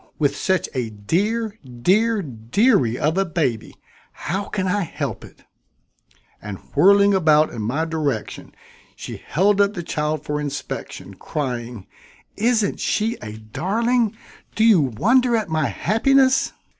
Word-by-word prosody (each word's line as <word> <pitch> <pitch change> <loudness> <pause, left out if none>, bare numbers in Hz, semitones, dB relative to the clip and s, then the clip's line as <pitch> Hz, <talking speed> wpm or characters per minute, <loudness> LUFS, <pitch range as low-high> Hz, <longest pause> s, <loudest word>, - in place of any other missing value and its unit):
With 145 -2 +1
such 190 +3 0
a 125 -4 -2
dear, 205 - -2
dear 195 - +1
dearie 125 - +1
of 155 +7 0
a - - +3
baby, 150 - -2 0.4
how 195 +3 -4
can 190 -2 -3
I 205 +2 0
help 170 - -4
it?" - - -15 1.0
And 105 -2 -6 0.2
whirling 200 +1 +5
about 155 -4 +4
in 115 - -6
my 135 +10 -1
direction, 150 -9 -4 0.4
she - - -7
held 200 +4 +2
up 200 +1 +1
the 175 - -4
child 150 -2 -2
for 150 0 -2
inspection, 145 -8 -6
crying: 120 - -5 0.5
"Isn't 220 -2 +1
she 225 +2 0
a 105 - -7
darling! 215 - -1 0.4
Do 220 - +2
you 220 -7 +6
wonder 235 - +2
at 215 -5 -1
my 155 -2 0
happiness?" 260 +6 +2
170 Hz, 135 wpm, -21 LUFS, 135-210 Hz, 1.0 s, you